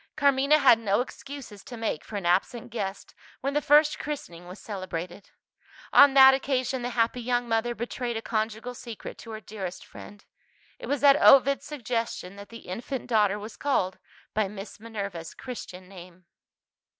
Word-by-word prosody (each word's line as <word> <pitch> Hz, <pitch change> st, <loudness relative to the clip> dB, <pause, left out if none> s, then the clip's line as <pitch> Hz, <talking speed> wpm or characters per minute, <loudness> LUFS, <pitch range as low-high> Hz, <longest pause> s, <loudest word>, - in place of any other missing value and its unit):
Carmina 280 Hz, 0 st, +4 dB
had 255 Hz, -6 st, +6 dB
no 205 Hz, -2 st, +1 dB
excuses 255 Hz, -4 st, -7 dB
to 245 Hz, -, -9 dB
make 225 Hz, -9 st, -3 dB
for 215 Hz, -, -10 dB
an 200 Hz, -3 st, -4 dB
absent 195 Hz, +7 st, 0 dB
guest, 200 Hz, -4 st, -5 dB, 0.3 s
when 275 Hz, +2 st, -2 dB
the 295 Hz, -, +1 dB
first 300 Hz, +1 st, +4 dB
christening 175 Hz, -, -6 dB
was 180 Hz, +2 st, -9 dB
celebrated. 185 Hz, -3 st, -6 dB, 0.6 s
On 280 Hz, -1 st, +8 dB
that 265 Hz, 0 st, +9 dB
occasion 265 Hz, -1 st, -1 dB
the 245 Hz, -, -2 dB
happy 230 Hz, +2 st, +1 dB
young 245 Hz, 0 st, 0 dB
mother 230 Hz, +1 st, 0 dB
betrayed 240 Hz, 0 st, -4 dB
a -, -, -4 dB
conjugal 220 Hz, +2 st, -2 dB
secret 235 Hz, -3 st, -9 dB
to 230 Hz, -, -11 dB
her 220 Hz, -1 st, -6 dB
dearest 195 Hz, -3 st, -7 dB
friend. 205 Hz, 0 st, -13 dB, 0.5 s
It -, -, -8 dB
was 285 Hz, -1 st, -1 dB
at 285 Hz, 0 st, +6 dB
Ovid's 275 Hz, +1 st, +6 dB
suggestion 230 Hz, -8 st, -4 dB
that 200 Hz, 0 st, -11 dB
the 230 Hz, -, -11 dB
infant 240 Hz, +8 st, -5 dB
daughter 210 Hz, -4 st, +2 dB
was 210 Hz, +1 st, -8 dB
called 190 Hz, -10 st, -1 dB, 0.3 s
by 215 Hz, -2 st, +1 dB
Miss 200 Hz, +1 st, -9 dB
Minerva's 200 Hz, -7 st, -6 dB
christian 185 Hz, -8 st, -8 dB
name. 180 Hz, -1 st, -13 dB
230 Hz, 165 wpm, -27 LUFS, 200-265 Hz, 0.6 s, that